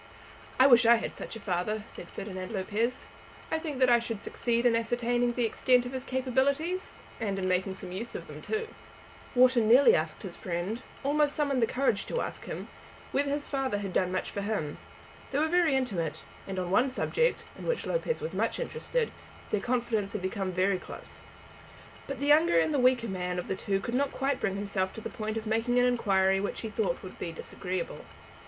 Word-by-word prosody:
"I 260 - +8
wish 250 -3 +8
I 235 - +9
had 230 - -3
such - - -7
a - - -6
father," 200 +2 -1
said - - -10
Ferdinand 185 -1 -6
Lopez. 220 +5 -1 0.4
"I 320 - +1
think 310 -4 -4
that 255 -1 +4
I 240 - +6
should 230 -2 -4
succeed 235 +3 -1
in 235 -1 +5
ascertaining 240 +1 +1
the 240 -1 +1
extent 245 +2 +3
of 245 - -5
his 260 -1 -4
capabilities, 275 +8 0 0.2
and 200 -4 -1
in 185 -1 -1
making 185 +1 0
some 185 -1 -7
use 215 +6 -5
of - - -5
them - - -10
too." 440 +1 -2 0.7
Wharton 250 -3 +5
nearly 265 - +7
asked - - -1
his - - -6
friend, 185 +6 -3 0.2
almost 290 +1 +2
summoned 275 -6 +1
courage 255 -5 +1
to - - -1
ask - - -4
him, - - -5 0.4
whether 280 +1 +1
his 285 +1 -1
father 270 -6 -1
had 200 -2 -4
done 180 0 +2
much 185 - -2
for 200 - -3
him. 200 -8 -2 0.5
They 275 - -1
were 310 +2 +3
very 335 -4 +3
intimate; 200 - -1 0.2
and 195 -1 -4
on 180 -1 -2
one 250 +7 +4
subject, 480 - +1
in - - -8
which - - 0
Lopez 480 -2 -1
was 475 - -3
much - - 0
interested, - - -2 0.4
their 210 - +1
confidence 235 -4 0
had 210 -4 -4
been 190 0 -2
very 185 +1 +2
close. - - -9 0.8
But 275 -2 -4
the 280 - -1
younger 295 - +5
and 165 - +3
the 285 - +2
weaker 250 -2 +4
man 180 -2 -2
of 180 - -3
the - - -1
two 195 0 -1
could 235 - -4
not 275 +2 +1
quite 270 0 -1
bring 195 -3 0
himself 195 -2 -1
to 220 - -7
the - - -5
point 215 0 -3
of 220 - -4
making 225 +3 +1
an 245 - +5
inquiry 195 -6 +3
which 200 - -3
he 225 - -4
thought - - -1
would - - -10
be - - -3
disagreeable. 475 +1 -5
235 Hz, 205 wpm, -29 LUFS, 195-270 Hz, 0.8 s, I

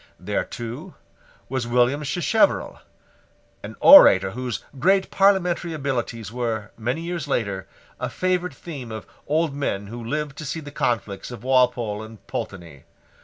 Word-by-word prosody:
There, 100 +3 -1
too, 120 0 -7 0.5
was 130 -2 -3
William 125 +4 +2
Sacheverell, 180 - +1 0.8
an - - -8
orator 95 - +9
whose 125 +1 -4 0.2
great 190 +6 +3
parliamentary 180 -4 +2
abilities 125 -7 -3
were, 115 -3 -3
many 125 +8 -2
years 170 -3 -4
later, 100 -8 -2 0.3
a - - -2
favourite 180 -4 -1
theme 135 -9 -8
of 110 0 -7 0.2
old 155 0 +1
men 105 -8 -2
who 115 +3 -8
lived 145 +3 -3
to 155 - -6
see 150 +4 -3
the 145 -2 -9
conflicts 110 -7 -2
of 120 -3 -9
Walpole 125 -5 +2
and 110 0 -12
Pulteney. 85 - -7
125 Hz, 140 wpm, -23 LUFS, 110-155 Hz, 0.8 s, orator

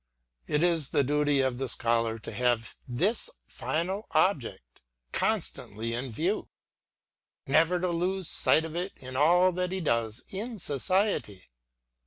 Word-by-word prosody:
It 150 +2 +1
is 165 -5 +2
the 140 - +2
duty 145 0 +2
of 130 -2 0
the 135 -2 -1
Scholar 115 -1 +1
to 115 - -8
have 120 +1 0
this 185 - 0 0.2
final 185 +6 -2
object 120 - 0 0.3
constantly 115 +3 -1
in 125 +3 -3
view, 170 - -1 0.5
— - - -65 0.3
never 165 +3 +3
to 180 +1 0
lose 180 +1 -1
sight 160 - +3
of 160 0 -7
it 180 +3 -3
in 130 0 -9
all 175 +6 +5
that 180 0 -2
he 190 - -1
does 115 -7 -1
in 220 +4 -4
society. 150 - 0
150 Hz, 145 wpm, -29 LUFS, 120-180 Hz, 0.5 s, all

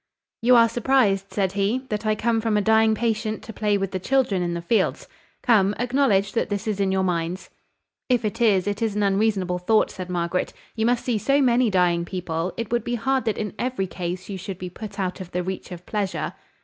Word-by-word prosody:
"You 245 +2 +5
are 230 -1 +7
surprised," 230 -5 +1
said 195 -3 0
he, 205 +7 0
"that 215 0 -2
I 215 - +3
am - - -5
come 225 0 +1
from 220 -2 +1
a - - +3
dying 220 +1 +4
patient 220 -1 -1
to 225 - -9
play 210 -1 +1
with 195 -1 -2
the 185 - -2
children 240 -3 +1
in 175 -1 -1
the - - -2
fields. 220 +6 0 0.4
Come, 205 -4 +4
acknowledge 245 -5 +2
that 230 - -1
this 205 0 -2
is 210 -2 -1
in 195 -1 +1
your 190 0 +1
minds." 175 0 -2 0.6
"If 245 -3 +2
it 225 +3 -3
is, 200 -6 +4
it 205 +1 -2
is 220 -3 0
an 210 - +1
unreasonable 195 -3 +1
thought," 215 +5 +2
said 185 -1 -7
Margaret. 175 0 -1 0.2
"You 220 0 +1
must 245 0 +1
see 235 -4 0
so 275 +6 +2
many 245 -3 +3
dying 175 -3 +2
people, 170 -1 -3
it 230 -2 -4
would 240 0 +1
be 240 - -2
hard 260 +2 0
that 220 - 0
in 210 -3 -3
every 250 -6 -1
case 180 0 -5
you 195 -2 -5
should 190 0 -6
be 180 -1 -6
put 205 +1 -8
out 185 0 -2
of 180 - -8
the 180 0 -1
reach 190 +1 -5
of 180 0 -8
pleasure." 205 -3 -2
205 Hz, 230 wpm, -24 LUFS, 185-230 Hz, 0.6 s, are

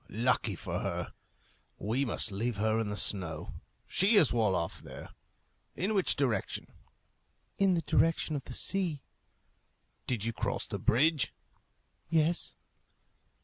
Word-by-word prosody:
Lucky 115 -2 +1
for - - -4
her! - - -3 0.6
We 120 +7 0
must 115 -2 +1
leave 115 +3 -2
her 110 +2 +1
in 110 - -1
the 105 - -3
snow. 85 -8 -1 0.3
She 200 +5 +3
is 170 -12 +6
well 110 -5 +2
off 85 -2 -3
there. - - -10 0.7
In 195 +5 0
which 195 -3 +3
direction?" 130 -6 -1 0.9
"In 195 -2 +4
the 165 - -1
direction 160 0 +2
of 135 - -4
the 125 - -7
sea." 180 -7 +1 1.0
"Did 115 -4 -1
you 115 - -1
cross - - -2
the - - -5
bridge?" 145 +3 +2 0.7
"Yes." 165 +1 +2
125 Hz, 135 wpm, -31 LUFS, 110-165 Hz, 1.0 s, is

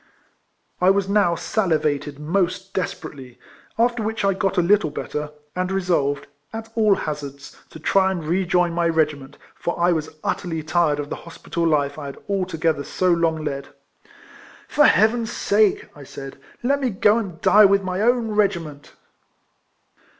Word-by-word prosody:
I 180 - +5
was 195 0 +2
now 200 -4 +3
salivated 155 -8 -1
most 185 +4 -1
desperately, 135 -8 -5 0.4
after 235 0 +2
which 220 -1 -2
I 195 - +3
got 195 +1 -1
a - - +5
little 195 -2 +3
better, 150 0 -4 0.3
and 185 +1 -1
resolved, 165 -7 0 0.3
at 225 0 -7
all 215 -3 +4
hazards, 145 -3 -6
to - - -11
try 190 +4 +3
and 180 -4 -3
rejoin 180 0 +1
my 170 0 +1
regi 160 -2 +2
ment, 135 +1 -13 0.2
for 170 - -4
I 175 +1 +3
was 155 -2 -2
utterly 165 -3 -2
tired 155 -2 +1
of 145 0 -5
the - - -3
hospital 170 0 -4
life 145 -2 +1
I 145 - -6
had 140 - -8
altogether 165 -6 -1
so 185 +5 0
long 165 -2 +1
led. 140 0 -4 0.5
" - - -20 0.2
For 295 - +4
Heaven's 225 +2 +3
sake," 210 -2 +2
I 145 - -12
said, 135 0 -9
" - - -28
let 280 +3 +2
me 260 - +1
go 210 +2 +3
and 185 -7 -6
die 210 +4 +6
with 200 0 +4
ray 185 +1 -2
own 240 0 +2
regiment 170 -8 -1
175 Hz, 165 wpm, -22 LUFS, 155-200 Hz, 0.5 s, die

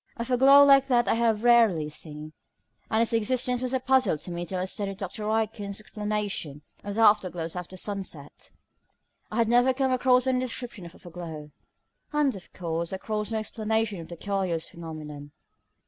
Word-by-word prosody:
A 235 - -3
foreglow 270 +3 +7
like 275 -1 +6
that 240 -3 +3
I - - +3
have 230 -1 +2
very 240 +3 +5 0.2
rarely 155 -3 -3
seen, 150 0 -8 0.6
and 220 +1 +3
its 230 - -2
existence 250 +2 +1
was 255 -1 -2
a 260 - +1
puzzle 255 -9 +2
to 175 - -8
me 175 0 -4
till 185 - -4
I 180 - -1
studied 195 0 -4
Dr. 210 +2 -5
Aitken's 215 -2 -2
explanation 210 -9 -4 0.2
of 205 0 -5
the 225 - +1
afterglows 180 -6 +2
after 180 +1 -7
sunset. 185 -8 -6 0.8
I - - -7
had 230 -1 +2
never 245 +2 +4
come 265 -1 +1
across 255 0 +3
any 260 -1 +1
description 240 -6 -5
of 170 - -15
a - - -15
foreglow; 165 -4 -9 0.6
and, 295 -4 +1
of 185 - -12
course, 170 -1 -3
across 210 +2 -3
no 225 - -1
explanation 220 -2 -2
of 165 - -10
the 170 - -8
curious 190 -4 -2
phenomenon. 150 -3 -9
210 Hz, 180 wpm, -27 LUFS, 175-240 Hz, 0.8 s, foreglow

